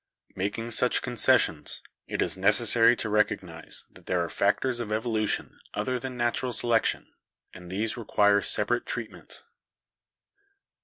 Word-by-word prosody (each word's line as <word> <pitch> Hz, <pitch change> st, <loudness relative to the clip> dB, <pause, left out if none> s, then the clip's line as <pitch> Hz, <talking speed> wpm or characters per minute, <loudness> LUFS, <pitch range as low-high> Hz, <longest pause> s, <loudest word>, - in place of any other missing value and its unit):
Making 105 Hz, +5 st, -3 dB
such 125 Hz, +2 st, +1 dB
concessions, 120 Hz, -, +2 dB, 0.2 s
it -, -, -1 dB
is -, -, -2 dB
necessary 115 Hz, +4 st, +4 dB
to 115 Hz, -, -3 dB
recognise 105 Hz, 0 st, -1 dB
that -, -, -18 dB
there 90 Hz, -2 st, +1 dB
are -, -, -7 dB
factors 120 Hz, +7 st, 0 dB
of 115 Hz, -3 st, -5 dB
evolution 110 Hz, -1 st, -1 dB, 0.2 s
other 125 Hz, +5 st, -1 dB
than 130 Hz, 0 st, -6 dB
natural 120 Hz, +1 st, -1 dB
selection, 115 Hz, 0 st, 0 dB, 0.4 s
and 90 Hz, -1 st, -11 dB
these 105 Hz, +5 st, -2 dB
require 105 Hz, -3 st, +3 dB
separate 120 Hz, +5 st, +1 dB
treatment. 115 Hz, -3 st, -7 dB
115 Hz, 125 wpm, -27 LUFS, 105-120 Hz, 0.4 s, necessary